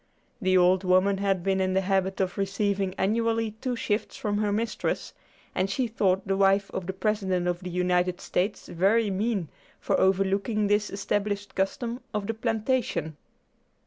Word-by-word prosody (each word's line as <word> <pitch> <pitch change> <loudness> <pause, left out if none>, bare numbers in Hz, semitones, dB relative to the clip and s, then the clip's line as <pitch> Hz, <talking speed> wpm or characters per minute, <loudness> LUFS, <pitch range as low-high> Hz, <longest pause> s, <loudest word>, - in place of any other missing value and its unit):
The 185 -1 +3
old 180 +1 +4
woman 185 +1 +3
had 195 -3 0
been 190 0 +1
in 185 0 0
the 190 - +3
habit 190 0 0
of 185 -2 0
receiving 195 -1 0
annually 225 +2 +1
two 255 -2 -1
shifts 215 -2 -2
from 205 -2 -1
her 210 -1 +1
mistress, 220 +2 -2 0.4
and 190 +1 0
she 250 +6 0
thought 195 -5 0
the 195 - +1
wife 195 0 +3
of 180 - -4
the 190 - -2
President 190 -3 0
of 175 -1 0
the 180 -1 -6
United 180 0 +1
States 195 +4 -2
very 200 +5 +2
mean 200 -2 -1 0.3
for - - 0
overlooking 195 +3 +2
this 205 +1 +2
established 205 +1 -2
custom 235 +5 -2
of 210 -1 -1
the 225 - -2
plantation. 225 - -1
195 Hz, 165 wpm, -27 LUFS, 185-215 Hz, 0.4 s, old